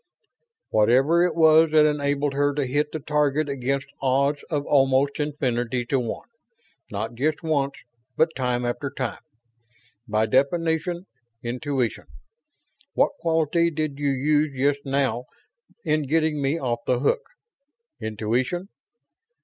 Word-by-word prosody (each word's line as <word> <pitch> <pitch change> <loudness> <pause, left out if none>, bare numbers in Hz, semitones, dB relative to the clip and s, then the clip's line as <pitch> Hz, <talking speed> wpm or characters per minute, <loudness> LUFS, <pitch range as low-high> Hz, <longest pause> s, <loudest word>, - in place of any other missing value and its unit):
"Whatever 130 +10 +4
it - - -4
was 160 0 +6
that 155 0 +5
enabled 145 -1 0
her 145 0 +1
to 145 -2 0
hit 145 +4 0
the 155 - -4
target 150 0 +1
against 140 0 -2 0.2
odds 140 +2 +1
of 145 -4 -1
almost 135 0 +2
infinity 125 -5 -1
to 135 +2 +1
one; 120 - -5 0.6
not 110 +3 -3
just 150 +7 -1
once, 140 -4 0 0.4
but 160 0 +2
time 125 -2 -1
after 140 +4 -2
time. 130 -3 -4 0.9
By 110 0 +1
definition, 160 - 0 0.4
intuition. 125 +1 -2 0.9
What - - +3
quality 165 0 +2
did 155 -3 -3
you 145 -1 +1
use 145 +1 +1
just 140 +1 +1
now 135 -3 0 0.6
in 155 -2 +1
getting 155 0 +1
me 140 +4 +1
off 120 -4 -1
the 125 - +2
hook? 455 - +1 0.8
Intuition. 120 - -2
140 Hz, 125 wpm, -24 LUFS, 130-155 Hz, 0.9 s, was